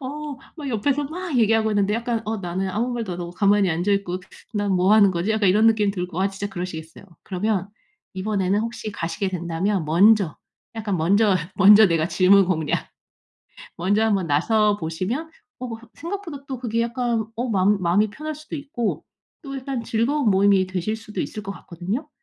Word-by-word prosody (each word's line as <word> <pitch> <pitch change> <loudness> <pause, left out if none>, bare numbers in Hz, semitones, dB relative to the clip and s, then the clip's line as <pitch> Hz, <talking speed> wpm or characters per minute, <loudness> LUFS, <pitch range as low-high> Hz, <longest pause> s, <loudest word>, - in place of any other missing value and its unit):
어 290 +2 -6 0.2
막 300 -3 -7
옆에서 270 +5 0
막 330 +1 -4
얘기하고 220 -1 +3
있는데 205 0 +1
약간 230 0 -1
어 220 +1 -2
나는 190 +1 -3
아무 235 +6 -1
말도 225 -6 -3
안 175 - -6
하고 170 0 -5
가만히 200 0 +3
앉아있고 185 +2 0 0.4
'난 205 -1 0
뭐 185 +2 +3
하는 205 -3 +6
거지?' 180 +3 -1
약간 215 -3 +2
이런 210 +4 +4
느낌이 215 -2 +3
들고 180 -2 -4
아 195 - +2
진짜 195 +1 -5
그러시겠어요. 175 -3 -7 0.2
그러면 195 +1 -1 0.5
이번에는 195 0 0
혹시 225 -1 -4
가시게 170 +1 -3
된다면 180 +1 -1
먼저 185 +2 +4 0.4
약간 215 -4 -2
먼저, 195 +5 +3 0.2
먼저 205 +3 +8
내가 165 -2 +1
질문 195 +1 +5
공략 160 -4 -1 0.9
먼저 200 +5 +2
한번 200 -5 +1
나서 210 +8 +2
보시면 190 - -3 0.3
어 255 - -5 0.3
생각보다 335 -4 -6
또 265 -2 -5
그게 230 -1 -1
약간 235 -1 -1
어 240 +3 -2
마음 200 -1 +2
마음이 190 +5 +2
편할 305 +8 -6
수도 305 +1 -9
있고 275 -6 -3 0.4
또 275 -3 -6
약간 260 -2 -4
즐거운 235 +3 +1
모임이 195 -1 +4
되실 185 +4 -2
수도 220 -1 -6
있을 210 - -6
것 195 - -6
같거든요. 190 - -5
205 Hz, 365 characters per minute, -23 LUFS, 185-230 Hz, 0.9 s, 먼저